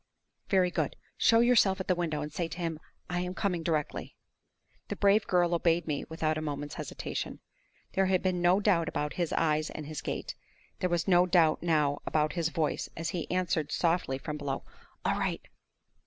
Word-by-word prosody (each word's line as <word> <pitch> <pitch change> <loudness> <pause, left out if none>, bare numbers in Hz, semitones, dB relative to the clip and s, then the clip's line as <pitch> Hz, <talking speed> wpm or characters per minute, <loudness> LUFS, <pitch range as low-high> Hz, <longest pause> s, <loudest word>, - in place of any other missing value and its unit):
"Very 185 -2 +3
good. - - -1 0.2
Show 230 0 +5
yourself 225 -5 +4
at 190 - -4
the 185 - +4
window, 160 -4 -2
and 150 0 -7
say 175 -3 -1
to 165 - -8
him, 165 -3 -3 0.3
'I 175 - 0
am 180 0 -3
coming 185 -5 0
directly.'" 155 -3 -2 0.7
The - - -3
brave 200 +1 +3
girl 175 -1 +3
obeyed 170 0 +2
me 150 -3 -2
without 155 -1 -1
a - - -4
moment's 145 -1 -4
hesitation. - - -5 0.5
There 195 0 +2
had 185 -1 +2
been 185 -2 0
no 175 +3 +4
doubt 185 -6 +2
about 150 0 -2
his 175 -3 -1
eyes 155 -1 +1
and 155 - -7
his 155 +1 -5
gait; - - -4 0.5
there 180 - 0
was 175 +1 0
no 180 -1 +5
doubt 170 -3 +4
now 150 -4 +2
about 155 0 +1
his 170 -3 0
voice, 160 -2 -1
as 165 0 -2
he 170 -1 -4
answered 175 -4 0
softly 165 -6 +1
from 150 +2 -5
below 145 -2 -3 0.4
"All - - +1
right!" - - -1
170 Hz, 190 wpm, -30 LUFS, 155-180 Hz, 0.7 s, Show